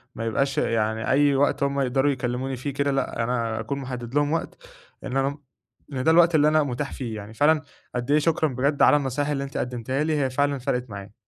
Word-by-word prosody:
ما 115 Hz, -, -4 dB
يبقاش 135 Hz, +5 st, 0 dB
يعني 110 Hz, 0 st, 0 dB
أي 140 Hz, +1 st, +4 dB
وقت 140 Hz, +1 st, +2 dB
هُم 140 Hz, 0 st, 0 dB
يقدروا 135 Hz, +2 st, +2 dB
يكلموني 130 Hz, +1 st, -3 dB
فيه 130 Hz, +2 st, -5 dB
كده 140 Hz, 0 st, 0 dB
لأ، 135 Hz, -4 st, -1 dB
أنا 115 Hz, -2 st, -1 dB
أكون 135 Hz, +5 st, -3 dB
محدِّد 125 Hz, -2 st, -6 dB
لهم 145 Hz, 0 st, +2 dB
وقت 165 Hz, -, -3 dB, 0.5 s
إن 130 Hz, -, -3 dB
أنا 140 Hz, +2 st, 0 dB, 0.6 s
إن 130 Hz, -1 st, -2 dB
ده 160 Hz, -, +4 dB
الوقت 170 Hz, 0 st, +5 dB
اللي 150 Hz, 0 st, +5 dB
أنا 155 Hz, 0 st, +4 dB
متاح 140 Hz, +1 st, -4 dB
فيه، 120 Hz, -4 st, -5 dB
يعني 105 Hz, +1 st, -8 dB
فعلًا 150 Hz, +4 st, +3 dB, 0.3 s
قد 125 Hz, +3 st, -2 dB
إيه 150 Hz, -, +5 dB
شكرًا 160 Hz, 0 st, +1 dB
بجد 140 Hz, +3 st, 0 dB
على 150 Hz, -, +7 dB
النصايح 140 Hz, +1 st, -2 dB
اللي 140 Hz, -2 st, -1 dB
أنتِ 135 Hz, -1 st, -6 dB
قدمتيها 125 Hz, +3 st, -2 dB
لي 155 Hz, -1 st, 0 dB
هي 135 Hz, -2 st, +1 dB
فعلًا 140 Hz, +2 st, 0 dB
فرقِت 125 Hz, -1 st, -2 dB
معايا. 100 Hz, 0 st, -9 dB
135 Hz, 220 wpm, -24 LUFS, 125-145 Hz, 0.6 s, على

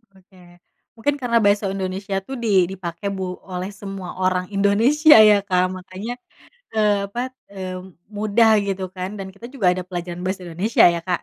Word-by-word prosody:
Oke, 190 Hz, 0 st, -23 dB, 0.6 s
mungkin 280 Hz, +6 st, 0 dB
karena 235 Hz, -2 st, +2 dB
bahasa 205 Hz, +1 st, +3 dB
Indonesia, 195 Hz, +1 st, -4 dB
tuh, 270 Hz, -, -5 dB
di 230 Hz, -, -1 dB, 0.2 s
dipakai 175 Hz, 0 st, -6 dB
bu 190 Hz, -, -4 dB, 0.3 s
oleh 180 Hz, +1 st, -4 dB
semua 195 Hz, -2 st, -8 dB
orang 185 Hz, -1 st, +1 dB
Indonesia, 235 Hz, +11 st, +5 dB
ya, 205 Hz, -1 st, +5 dB
Kak, 180 Hz, -1 st, +2 dB
makanya, 185 Hz, +5 st, -7 dB, 0.6 s
eee, 210 Hz, -2 st, +2 dB
apa, 235 Hz, -, -5 dB, 0.3 s
eee, 185 Hz, -1 st, -5 dB, 0.4 s
mudah, 215 Hz, +2 st, +3 dB, 0.2 s
gitu, 195 Hz, -1 st, -3 dB
kan, 185 Hz, +1 st, -4 dB
dan 195 Hz, -1 st, -6 dB
kita 200 Hz, +4 st, -12 dB
juga 210 Hz, -10 st, +2 dB
ada 185 Hz, -, -4 dB
pelajaran 175 Hz, -1 st, -6 dB
bahasa 190 Hz, 0 st, -2 dB
Indonesia, 180 Hz, +7 st, +2 dB
ya, 170 Hz, -1 st, -1 dB
Kak. 180 Hz, -2 st, -1 dB
195 Hz, 165 wpm, -21 LUFS, 185-210 Hz, 0.6 s, Indonesia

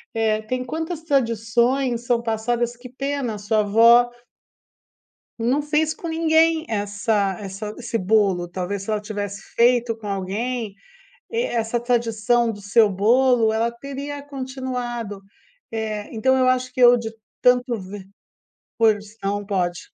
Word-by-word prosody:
Eh, 220 Hz, -1 st, +1 dB
tem 255 Hz, +3 st, -3 dB
quantas 320 Hz, +5 st, -4 dB
tradições 240 Hz, -2 st, +1 dB
são 235 Hz, -1 st, +1 dB
passadas, 235 Hz, +1 st, -1 dB
que 250 Hz, +1 st, -11 dB
pena, 265 Hz, -4 st, -3 dB
sua 215 Hz, +1 st, 0 dB
avó 230 Hz, +4 st, +6 dB, 1.3 s
Não 250 Hz, +6 st, +1 dB
fez 305 Hz, +1 st, +1 dB
com 335 Hz, -, -7 dB
ninguém 320 Hz, 0 st, +3 dB
essa 205 Hz, -2 st, 0 dB
essa 210 Hz, +2 st, -6 dB
esse 235 Hz, -2 st, -3 dB
bolo, 190 Hz, -3 st, +2 dB
talvez 190 Hz, +2 st, -4 dB
se 205 Hz, -, -5 dB
ela 215 Hz, -1 st, 0 dB
tivesse 205 Hz, -2 st, -5 dB
feito 240 Hz, -1 st, +3 dB
com 220 Hz, -2 st, -10 dB
alguém, 205 Hz, +3 st, -3 dB, 0.6 s
e 465 Hz, +1 st, 0 dB
essa 235 Hz, -, -1 dB
tradição 235 Hz, -1 st, +1 dB
do 205 Hz, -, -10 dB
seu 210 Hz, +2 st, +4 dB
bolo, 230 Hz, +3 st, +3 dB
ela 230 Hz, +1 st, +1 dB
teria 280 Hz, +3 st, -7 dB
continuado, 255 Hz, -6 st, -5 dB, 0.5 s
eh, 215 Hz, -2 st, -4 dB
então 260 Hz, +4 st, +2 dB
eu 255 Hz, -1 st, +3 dB
acho 255 Hz, 0 st, +1 dB
que 255 Hz, -, -5 dB
eu, 245 Hz, 0 st, +8 dB
de 225 Hz, -1 st, -4 dB, 0.3 s
tanto 250 Hz, -1 st, +3 dB
ver 190 Hz, +1 st, -9 dB, 0.7 s
porção, 210 Hz, -2 st, 0 dB
pode. 180 Hz, -3 st, -1 dB
230 Hz, 135 wpm, -22 LUFS, 210-255 Hz, 1.3 s, eu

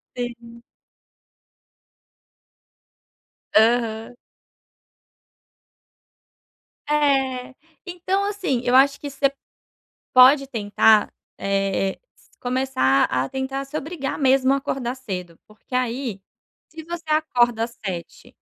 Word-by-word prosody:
Sim. 235 Hz, -1 st, -7 dB, 2.9 s
Aham. 225 Hz, +1 st, +2 dB, 2.7 s
É, 270 Hz, -3 st, +1 dB, 0.3 s
então, 370 Hz, +2 st, -2 dB
assim, 385 Hz, -12 st, -1 dB
eu 245 Hz, +1 st, +2 dB
acho 275 Hz, +1 st, +5 dB
que 290 Hz, -, -6 dB
você 275 Hz, 0 st, 0 dB, 0.8 s
pode 270 Hz, +2 st, +7 dB
tentar, 215 Hz, -2 st, +3 dB, 0.2 s
eh, 195 Hz, -1 st, 0 dB, 0.2 s
s -, -, -27 dB
começar 245 Hz, -, +1 dB
a 130 Hz, +1 st, -1 dB
tentar 270 Hz, +1 st, -4 dB
se 300 Hz, +3 st, -5 dB
obrigar 300 Hz, -3 st, -4 dB
mesmo 265 Hz, 0 st, +3 dB
a -, -, +2 dB
acordar 260 Hz, -2 st, -3 dB
cedo 180 Hz, -9 st, -7 dB
porque 215 Hz, +4 st, -10 dB
aí, 245 Hz, -4 st, -2 dB, 0.5 s
se 320 Hz, 0 st, -10 dB
você 340 Hz, +1 st, -7 dB
acorda 240 Hz, -7 st, +2 dB
às 235 Hz, -, -4 dB
7h 175 Hz, -3 st, -7 dB
255 Hz, 95 wpm, -22 LUFS, 225-275 Hz, 2.9 s, pode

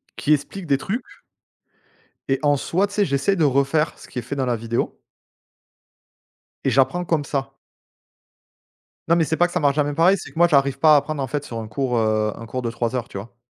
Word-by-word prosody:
qui 150 Hz, -, +2 dB
expliquent 150 Hz, +6 st, -3 dB
des 140 Hz, -2 st, +3 dB
trucs 220 Hz, -, -3 dB, 1.3 s
et 135 Hz, 0 st, +1 dB
en 145 Hz, -1 st, +3 dB
soi, 185 Hz, +8 st, 0 dB
tu 200 Hz, -, -12 dB
sais, 205 Hz, -, +3 dB
j'essaie 140 Hz, +5 st, +1 dB
de 165 Hz, -, +2 dB
refaire 140 Hz, +3 st, +1 dB
ce -, -, -14 dB
qui -, -, -7 dB
est -, -, -2 dB
fait 135 Hz, +5 st, -5 dB
dans 135 Hz, -2 st, -1 dB
la 120 Hz, -2 st, +1 dB
vidéo 115 Hz, +1 st, -3 dB, 1.6 s
et 135 Hz, -, +2 dB
j'apprends 135 Hz, +8 st, +2 dB
comme 165 Hz, -4 st, 0 dB
ça. 135 Hz, -1 st, -3 dB, 1.6 s
Non, 170 Hz, -, +4 dB
mais 165 Hz, -, +3 dB
c'est 160 Hz, -, -1 dB
pas 175 Hz, +3 st, +4 dB
que -, -, -12 dB
ça 180 Hz, -, +1 dB
marche 145 Hz, -4 st, +2 dB
jamais 145 Hz, 0 st, 0 dB
pareil, 175 Hz, +6 st, +4 dB
c'est -, -, -9 dB
que -, -, -10 dB
moi 175 Hz, -, +6 dB
j'arrive 140 Hz, -4 st, +2 dB
pas 155 Hz, +1 st, +6 dB
à -, -, +7 dB
apprendre, 150 Hz, +1 st, -3 dB
en -, -, -2 dB
fait, 145 Hz, +2 st, -3 dB
sur 115 Hz, -5 st, -6 dB
un 110 Hz, -, -5 dB
cours, 125 Hz, +3 st, -2 dB
heu, 110 Hz, -1 st, +1 dB
un 115 Hz, -, -9 dB
cours 130 Hz, +2 st, -4 dB
de 115 Hz, -, -2 dB
3 115 Hz, +1 st, -2 dB
heures, 120 Hz, -2 st, -2 dB
tu 100 Hz, -, -7 dB
vois? 110 Hz, +5 st, -10 dB
140 Hz, 230 wpm, -22 LUFS, 125-160 Hz, 1.6 s, à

